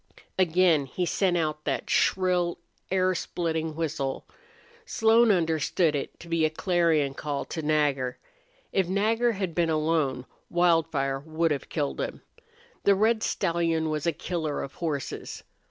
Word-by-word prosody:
Again 170 -5 +3
he 180 +7 -2
sent 180 0 +1
out 155 -2 -2
that 140 - -2
shrill, 180 -2 +2 0.3
air 185 0 +2
splitting 160 -2 -2
whistle. 150 -4 -3 0.6
Slone 225 +1 +4
understood 165 -3 +2
it 140 - -5
to 170 - -11
be 165 -1 +1
a 155 - +4
clarion 160 -4 +1
call 145 0 -4
to 160 - -5
Nagger. 145 -4 +1 0.5
If 190 -3 +1
Nagger 225 +5 +2
had 190 -4 -3
been 170 0 +1
alone 155 -5 0 0.2
Wildfire 165 -6 +2
would 160 +2 -1
have 145 - -3
killed 145 -3 -2
him. - - -5 0.6
The 200 - +5
red 220 +3 +2
stallion 165 -5 0
was 155 +1 -2
a - - +4
killer 160 -2 -3
of 135 - -7
horses. 155 -5 -4
165 Hz, 140 wpm, -27 LUFS, 150-180 Hz, 0.6 s, The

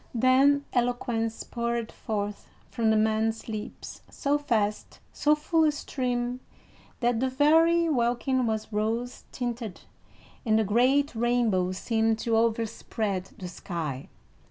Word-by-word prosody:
Then 270 +4 +4
eloquence 240 -2 -1
poured 235 -1 -3
forth 205 -1 -4 0.2
from 225 -2 +1
the 220 - +4
man's 220 +1 0
lips 215 -2 -7
so 290 0 0
fast, 215 -7 -1 0.2
so 300 +1 +3
full 320 +2 +1
a 305 - +4
stream, 250 -3 -2 0.6
that 240 -1 +2
the 260 +1 +1
very 325 +5 +4
welkin 250 -2 +1
was 220 0 -3
rose 225 +4 -2
tinted, 235 -7 -4 0.6
and 220 -2 +3
a - - +3
great 255 +7 +2
rainbow 225 -6 +1
seemed 225 +2 +1
to 230 0 0
overspread 225 -3 -1
the 185 - -6
sky. 165 -6 -5
235 Hz, 125 wpm, -27 LUFS, 220-255 Hz, 0.6 s, Then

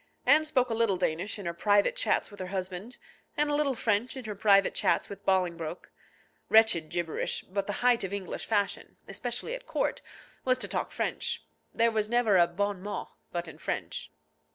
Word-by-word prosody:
Anne 300 +4 +6
spoke 255 -5 +1
a - - +1
little 225 -4 +2
Danish 175 +6 -1
in 200 - -8
her 170 - -2
private 205 +3 +3
chats - - +1
with 205 - -12
her 185 - -4
husband, 190 +4 -5 0.4
and 295 0 +2
a - - 0
little 290 -2 +2
French 225 +3 0
in 255 - -7
her 215 - -3
private 200 -1 +4
chats - - +1
with 200 - -9
Bolingbroke. 175 -3 0 0.6
Wretched 220 -8 +5
gibberish; 170 -2 -2
but 195 +1 -3
the 205 - -1
height 245 -3 +5
of 190 - -3
English 200 -2 -4
fashion, 205 -3 -1
especially 240 - -3
at - - -7
court, - - -1 0.4
was 255 -1 +3
to - - -2
talk - - -2
French. - - -2 0.3
There 230 0 +3
was 215 -1 0
never 235 -4 +3
a 175 -1 +6
bon 200 +2 -2
mot 205 +2 -5 0.2
but 175 -1 -3
in 160 - -11
French. - - -4
205 Hz, 190 wpm, -29 LUFS, 185-235 Hz, 0.6 s, Anne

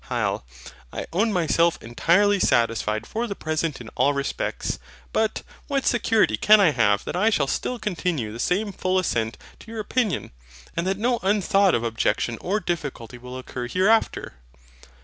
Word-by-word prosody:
HYL. - - -1 0.5
I - - -5
own 215 +6 +2
myself 170 -2 +2
entirely 195 - +2
satisfied 115 - +1
for 235 +2 -3
the 200 - -4
present 155 -2 -2
in 115 -2 -9
all 145 - +2
respects. 140 0 -2 0.3
But, 220 -1 0 0.2
what 275 -2 -1
security 225 - +2
can 215 - +6
I 190 -6 +5
have 105 -6 +2
that - - -4
I 210 +5 +3
shall 205 - +2
still 250 - -2
continue 175 - -2
the 115 - -8
same 200 - 0
full 185 0 -1
assent 115 -11 0 0.2
to - - -14
your 225 -1 -6
opinion, 215 -1 -1 0.4
and 170 +2 -1
that 190 0 0
no 240 +3 +1
unthought 195 -1 +3
of 115 - -1
objection 115 0 0
or 200 +4 0
difficulty 145 - -4
will 125 +1 -8
occur 125 -1 -6
hereafter? 195 - +1
175 Hz, 165 wpm, -24 LUFS, -, 0.5 s, can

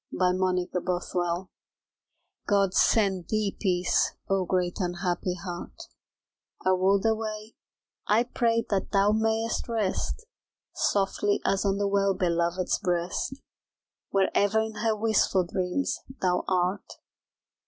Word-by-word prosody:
A - - -5
SONG 185 0 +1
OF 180 - -1
HELOISE 175 0 -1 1.0
God 200 -2 +2
send 195 -6 +2
thee 215 -2 0
peace, 180 -3 +1
Oh, 195 -1 +1
great 180 -1 -1
unhappy 180 0 -1
heart 175 -1 -7 0.9
A 185 0 +4
world 195 +2 +2
away, 220 0 -2 0.5
I 220 +3 +4
pray 230 -2 0
that 195 -2 0
thou 200 0 +4
mayst 225 +2 0
rest 225 - -2 0.5
Softly 200 +1 +1
as 195 +1 +1
on 195 0 +1
the 200 0 0
Well 200 -1 +1
Belovèd's 175 0 0
breast, 180 +9 -2 0.7
Where 195 -1 +2
ever 205 +2 +3
in 220 0 -4
her 220 0 +1
wistful 215 -3 +2
dreams 180 +9 -1 0.2
thou 180 -1 +1
art. 185 +1 0
195 Hz, 120 wpm, -27 LUFS, 180-215 Hz, 1.0 s, A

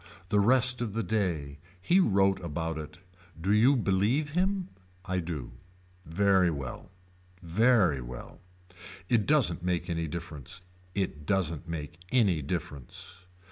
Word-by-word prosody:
The 105 - +3
rest 125 +3 +4
of 110 -4 -2
the 115 +1 -1
day. 85 -9 -1 0.2
He 175 - +3
wrote 95 - +3
about 80 -2 -3
it. 80 +1 -9 0.4
Do 95 +5 +1
you 120 +7 +5
believe 115 +7 +1
him. 185 +2 0 0.4
I 90 0 -1
do. 80 -8 -5 0.6
Very 95 +1 +3
well. 70 0 -6 0.5
Very 90 - +3
well. - - -9 0.7
It 115 -4 +2
doesn't 130 - +3
make 90 0 -1
any 85 -1 -1
difference. 85 0 -7 0.3
It 75 -7 -3
doesn't 85 -5 0
make 80 -1 -6
any 100 -11 +3
difference. 80 +3 -6
90 Hz, 130 wpm, -29 LUFS, 80-110 Hz, 0.7 s, you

